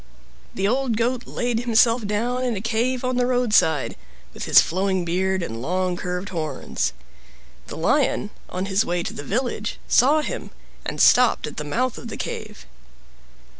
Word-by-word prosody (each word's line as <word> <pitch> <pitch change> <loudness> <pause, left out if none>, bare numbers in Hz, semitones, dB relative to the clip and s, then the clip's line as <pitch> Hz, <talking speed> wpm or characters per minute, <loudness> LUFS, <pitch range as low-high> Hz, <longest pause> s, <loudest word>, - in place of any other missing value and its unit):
The 195 +1 0
old 250 0 0
Goat 245 +2 -1
laid 240 -2 -1
himself 230 -1 +3
down 240 +5 -1
in 245 -3 0
a - - -3
cave 235 +4 -1
on 255 0 0
the 245 0 +2
roadside, 210 - +2 0.4
with - - -6
his - - +7
flowing 190 0 0
beard 185 +2 0
and 115 -7 -5
long 180 +5 -1
curved 180 +1 -4
horns. 155 -6 -3 0.7
The - - -7
Lion, - - +1 0.2
on 185 +1 -3
his 195 +2 +2
way 175 0 -1
to - - -5
the - - -6
village, 215 - -2
saw 290 +5 +4
him, - - -5 0.4
and - - -4
stopped 250 -1 +5
at 150 - -8
the 150 - -3
mouth 240 - -1
of 240 - -8
the 225 - -6
cave. 215 -1 -6
215 Hz, 170 wpm, -23 LUFS, 180-245 Hz, 0.7 s, his